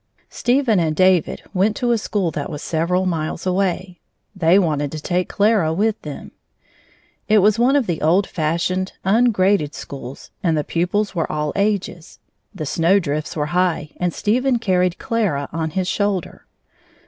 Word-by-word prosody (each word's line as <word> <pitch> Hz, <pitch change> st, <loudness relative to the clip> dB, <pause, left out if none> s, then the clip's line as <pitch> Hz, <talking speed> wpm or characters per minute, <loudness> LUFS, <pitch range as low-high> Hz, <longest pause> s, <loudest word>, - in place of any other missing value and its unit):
Stephen 245 Hz, -5 st, +2 dB
and 160 Hz, -2 st, 0 dB
David 185 Hz, -1 st, +2 dB
went 205 Hz, +3 st, +2 dB
to 245 Hz, +1 st, 0 dB
a 235 Hz, -, +3 dB
school 200 Hz, -5 st, -1 dB
that 145 Hz, -, -4 dB
was 150 Hz, -2 st, -6 dB
several 175 Hz, +3 st, 0 dB
miles 165 Hz, -1 st, -2 dB
away. 185 Hz, -1 st, -1 dB, 0.4 s
They 175 Hz, 0 st, +4 dB
wanted 150 Hz, -6 st, 0 dB
to 155 Hz, -, -4 dB
take 180 Hz, +3 st, -1 dB
Clara 205 Hz, -6 st, +2 dB
with 210 Hz, +6 st, 0 dB
them. 150 Hz, -2 st, -8 dB, 1.0 s
It 215 Hz, -, +5 dB
was 210 Hz, +2 st, +4 dB
one 255 Hz, +4 st, +4 dB
of 280 Hz, -4 st, +2 dB
the 170 Hz, -5 st, -3 dB
old 175 Hz, +6 st, +3 dB
fashioned, 170 Hz, +4 st, -1 dB
ungraded 195 Hz, -7 st, +2 dB
schools, 135 Hz, -1 st, -9 dB
and 165 Hz, -4 st, +1 dB
the 150 Hz, -, 0 dB
pupils 180 Hz, +7 st, -1 dB
were 165 Hz, -3 st, -2 dB
all 150 Hz, -1 st, -2 dB
ages. 200 Hz, -4 st, -2 dB, 0.3 s
The 185 Hz, -8 st, -6 dB
snowdrifts 165 Hz, -1 st, +1 dB
were 150 Hz, -2 st, -1 dB
high, 175 Hz, -4 st, 0 dB
and 180 Hz, -1 st, 0 dB
Stephen 245 Hz, +8 st, +1 dB
carried 180 Hz, -5 st, +1 dB
Clara 195 Hz, -12 st, -1 dB
on 160 Hz, -1 st, -2 dB
his 185 Hz, +2 st, -2 dB
shoulder. 200 Hz, -3 st, -2 dB
180 Hz, 160 wpm, -20 LUFS, 160-205 Hz, 1.0 s, It